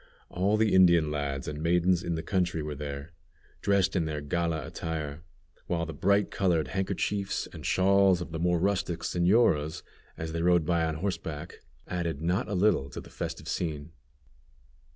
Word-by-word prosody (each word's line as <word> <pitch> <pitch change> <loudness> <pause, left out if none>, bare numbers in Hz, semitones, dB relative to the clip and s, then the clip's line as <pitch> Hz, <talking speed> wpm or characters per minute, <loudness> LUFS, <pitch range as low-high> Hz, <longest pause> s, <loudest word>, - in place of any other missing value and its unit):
All 100 +4 +1
the 110 -1 +2
Indian 85 -5 +5
lads 70 -2 -3
and 75 0 -4
maidens 90 +2 +3
in 85 - -2
the 80 - -4
country 90 -5 0
were 75 0 -4
there, 70 +1 -6 0.5
dressed 100 -2 +2
in 85 -3 +1
their 75 -1 -3
gala 80 +2 -1
attire, 80 -2 -5 0.5
while 85 -1 -1
the 80 - -6
bright 100 +7 +2
colored 90 -5 +1
handkerchiefs 95 +1 -1
and - - -9
shawls 95 -1 +4
of 85 - -6
the 80 - -4
more 90 +1 +2
rustic 90 -2 0
señoras, 85 -5 +2 0.3
as 80 0 -4
they 85 0 -2
rode 85 -2 +3
by 85 0 +2
on 80 -1 -2
horseback, 80 -4 -4 0.3
added 85 -4 -2
not 90 +8 0
a 105 - -2
little 90 -8 +2
to - - -7
the - - -12
festive - - -5
scene. 80 -2 -3
85 Hz, 170 wpm, -28 LUFS, 80-95 Hz, 0.5 s, Indian